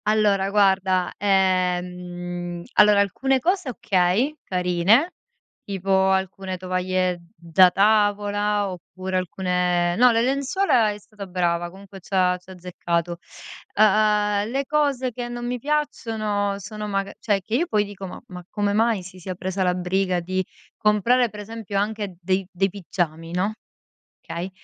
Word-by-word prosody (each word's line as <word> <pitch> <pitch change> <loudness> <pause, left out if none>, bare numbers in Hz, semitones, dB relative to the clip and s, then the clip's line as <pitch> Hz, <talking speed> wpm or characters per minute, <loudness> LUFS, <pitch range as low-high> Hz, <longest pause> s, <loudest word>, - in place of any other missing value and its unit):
Allora 210 -2 +2
guarda, 190 -3 +2
ehm 180 -2 -1
allora 210 -1 +6
alcune 265 +7 +1
cose 360 +1 0
okay, 200 +5 +1
carine, 180 - +2 0.5
tipo 195 -1 -4 0.2
alcune 190 0 -1
tovaglie 185 -1 -1
da 170 +2 +5
tavola 205 0 +2
oppure 185 +1 -5
alcune 180 -1 0
no, 250 +2 +7
le 230 0 +2
lenzuola 270 - +2
è 205 - -6
stata 205 -1 -11
brava, 175 -1 0
comunque 195 +2 -13
c'ha 185 -1 +1
c'ha 185 +1 -15
azzeccato, 175 -1 -3 0.6
uhm, 210 0 +3
le 275 +3 -1
cose 275 -3 0
che 245 +1 -5
non 240 0 -5
mi 245 0 -2
piacciono 220 -8 -1
sono 210 +2 -7
maga 195 -1 -2
cioè, 205 -3 0
che 215 +4 -8
io 335 +7 +1
poi 210 -6 +2
dico, 195 -1 -8
ma - - -8
ma 180 -1 -8
come 205 -1 -1
mai 220 -2 +2
si 185 0 -12
sia 185 +1 -6
presa 190 +2 -3
la 180 -1 +1
briga 180 0 0
di 185 +2 -2 0.3
comprare 230 +4 +3
per 210 0 -9
esempio 215 -1 -5
anche 205 -2 -2
dei 185 +1 -1
dei 195 +2 +1
pigiami, 170 -3 -4
no, 190 +4 0 0.7
okay, 175 +3 -5
195 Hz, 140 wpm, -23 LUFS, 180-215 Hz, 0.7 s, no